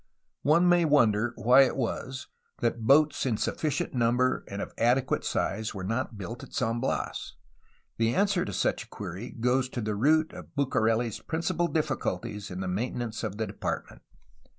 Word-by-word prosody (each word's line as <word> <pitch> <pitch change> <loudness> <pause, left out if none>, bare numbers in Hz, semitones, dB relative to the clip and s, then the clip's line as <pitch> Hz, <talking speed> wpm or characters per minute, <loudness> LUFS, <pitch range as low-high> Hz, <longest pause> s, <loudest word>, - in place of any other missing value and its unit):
One 170 +4 +4
may 175 -1 +5
wonder 120 -7 +3
why 125 +3 +6
it 135 - +2
was 130 +1 -3 0.3
that 115 -1 -1
boats 150 +2 +5
in 115 -4 +1
sufficient 150 +4 -1
num 120 -1 +2
bers 130 0 +1
and 100 - -6
of - - -5
adequate 125 +3 +2
size 110 0 -2
were 95 - -5
not 115 +2 -2
built 110 +5 -6
at - - -11
San 115 -1 0
Bias. 130 - -3 0.6
The 115 +1 +1
answer 200 -2 +2
to - - -4
such 95 - 0
a - - -30
query 95 +8 -6
goes 125 +2 0
to 125 - -5
the 105 -2 -1
root 155 +9 +3
of - - -11
BucareH's 115 -5 +1
principal 165 +1 -1
difficulties 110 - -2
in 90 +1 -5
the 95 - -3
maintenance 115 +3 -3
of 105 -2 -3
the 110 - -1
Department. - - -5
120 Hz, 175 wpm, -28 LUFS, 110-140 Hz, 0.6 s, why